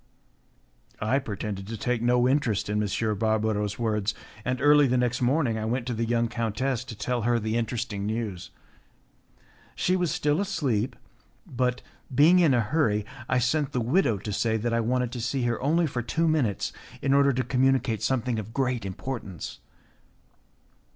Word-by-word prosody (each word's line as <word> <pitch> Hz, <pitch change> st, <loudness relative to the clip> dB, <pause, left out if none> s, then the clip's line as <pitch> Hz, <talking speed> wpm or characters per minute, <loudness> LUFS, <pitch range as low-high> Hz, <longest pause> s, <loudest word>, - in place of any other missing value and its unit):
I 115 Hz, +6 st, +1 dB
pretended 100 Hz, -5 st, -5 dB
to 115 Hz, +1 st, -5 dB
take 125 Hz, +2 st, -1 dB
no 120 Hz, +1 st, +3 dB
interest 125 Hz, -7 st, +1 dB
in 105 Hz, 0 st, +1 dB
M. 105 Hz, +1 st, -1 dB
Barbaro's 110 Hz, -2 st, 0 dB
words, 110 Hz, -2 st, -1 dB, 0.3 s
and 125 Hz, +1 st, -1 dB
early 145 Hz, 0 st, +6 dB
the 125 Hz, 0 st, +2 dB
next 125 Hz, 0 st, 0 dB
morning 125 Hz, -3 st, +1 dB
I 110 Hz, -, -3 dB
went 120 Hz, +2 st, -1 dB
to 125 Hz, -, -2 dB
the 115 Hz, +1 st, -1 dB
young 115 Hz, 0 st, +1 dB
countess 115 Hz, +2 st, -1 dB
to 120 Hz, -, -8 dB
tell 125 Hz, +3 st, -2 dB
her 120 Hz, +2 st, +2 dB
the 110 Hz, 0 st, -2 dB
interesting 115 Hz, -3 st, -2 dB
news. 105 Hz, -5 st, -3 dB, 1.3 s
She 185 Hz, -, +1 dB
was 180 Hz, -2 st, +1 dB
still 150 Hz, +4 st, +1 dB
asleep; 130 Hz, -, -1 dB, 0.5 s
but, 125 Hz, 0 st, -1 dB, 0.3 s
being 165 Hz, +7 st, +6 dB
in 160 Hz, -7 st, +4 dB
a 120 Hz, -, +3 dB
hurry, 110 Hz, -4 st, +1 dB, 0.2 s
I 125 Hz, -, +2 dB
sent 135 Hz, +4 st, +1 dB
the 125 Hz, -, +1 dB
widow 125 Hz, -, +2 dB
to 105 Hz, +2 st, -5 dB
say 110 Hz, +2 st, +1 dB
that 115 Hz, +2 st, -1 dB
I 115 Hz, -, +2 dB
wanted 125 Hz, +1 st, 0 dB
to 125 Hz, -1 st, -5 dB
see 125 Hz, +3 st, -1 dB
her 120 Hz, -1 st, -1 dB
only 165 Hz, +6 st, +2 dB
for 130 Hz, -5 st, -2 dB
two 165 Hz, +8 st, 0 dB
minutes 135 Hz, -, 0 dB, 0.3 s
in 135 Hz, 0 st, +2 dB
order 140 Hz, 0 st, +5 dB
to 130 Hz, +1 st, 0 dB
communicate 130 Hz, -3 st, +1 dB
something 125 Hz, -3 st, 0 dB
of 110 Hz, +2 st, -8 dB
great 125 Hz, -6 st, 0 dB
importance. 95 Hz, -, -6 dB
120 Hz, 170 wpm, -26 LUFS, 110-135 Hz, 1.3 s, early